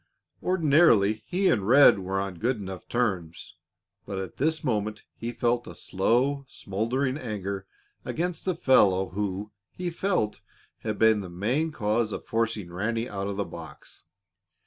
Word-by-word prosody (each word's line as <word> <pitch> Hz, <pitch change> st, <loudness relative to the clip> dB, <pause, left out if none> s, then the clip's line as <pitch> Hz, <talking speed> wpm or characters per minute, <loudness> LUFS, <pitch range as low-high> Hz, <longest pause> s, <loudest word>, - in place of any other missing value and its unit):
Ordinarily, 145 Hz, -, +4 dB
he 190 Hz, +2 st, +1 dB
and 100 Hz, -, +2 dB
Red 135 Hz, -3 st, +7 dB
were 95 Hz, +1 st, -2 dB
on 95 Hz, -3 st, -4 dB
good 120 Hz, +2 st, +1 dB
enough 95 Hz, -3 st, -7 dB
terms, 95 Hz, -9 st, -2 dB, 0.5 s
but 100 Hz, -1 st, -4 dB
at 95 Hz, -3 st, -5 dB
this 160 Hz, +4 st, 0 dB
moment 110 Hz, -5 st, -1 dB
he 115 Hz, +1 st, -4 dB
felt 120 Hz, 0 st, 0 dB
a -, -, -9 dB
slow, 125 Hz, +9 st, +1 dB
smoldering 130 Hz, +8 st, -2 dB
anger 100 Hz, -5 st, -4 dB, 0.4 s
against 175 Hz, +1 st, -3 dB
the 185 Hz, -2 st, 0 dB
fellow 95 Hz, -, +4 dB
who, 100 Hz, +1 st, -3 dB, 0.2 s
he 180 Hz, -1 st, -4 dB
felt, 170 Hz, -, -1 dB, 0.4 s
had 110 Hz, -1 st, -3 dB
been 110 Hz, -2 st, +4 dB
the 95 Hz, -, -7 dB
main 120 Hz, -, -1 dB
cause 110 Hz, -3 st, 0 dB
of -, -, -6 dB
forcing 110 Hz, -6 st, -2 dB
Ranny 115 Hz, +5 st, -1 dB
out 100 Hz, -3 st, -4 dB
of 100 Hz, -1 st, -4 dB
the 100 Hz, -, -1 dB
box. -, -, -11 dB
110 Hz, 150 wpm, -27 LUFS, 100-130 Hz, 0.5 s, Red